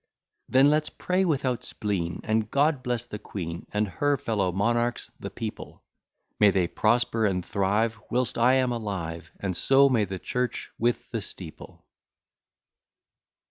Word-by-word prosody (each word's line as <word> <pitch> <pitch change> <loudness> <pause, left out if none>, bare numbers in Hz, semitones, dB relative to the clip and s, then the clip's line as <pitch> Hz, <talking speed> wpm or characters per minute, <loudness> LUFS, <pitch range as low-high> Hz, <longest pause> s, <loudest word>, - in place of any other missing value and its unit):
Then 135 +3 +6
let's 155 0 +2
pray 185 +1 0
without 130 -6 0
spleen, 95 -5 -3
May 110 0 +3
God 140 +6 +1
bless 120 -2 -2
the 105 - -7
queen, 85 -5 -6
And 105 0 +1
her 145 +8 +1
fellow 100 -7 0
monarchs 120 +5 0
the - - -5
people; - - -7 0.6
May 105 - +7
they 95 -2 +2
prosper 115 +3 +2
and 90 -3 -1
thrive, 105 +3 0
Whilst 125 0 0
I 125 +3 +4
am 130 -1 +2
alive, 95 -8 -4
And 95 -3 -2
so 135 +6 +5
may 115 -5 +2
the 95 0 -5
church 125 +6 -3
with 120 0 0
the 115 -2 -2
steeple. 90 -4 -10
115 Hz, 145 wpm, -27 LUFS, 100-125 Hz, 0.6 s, May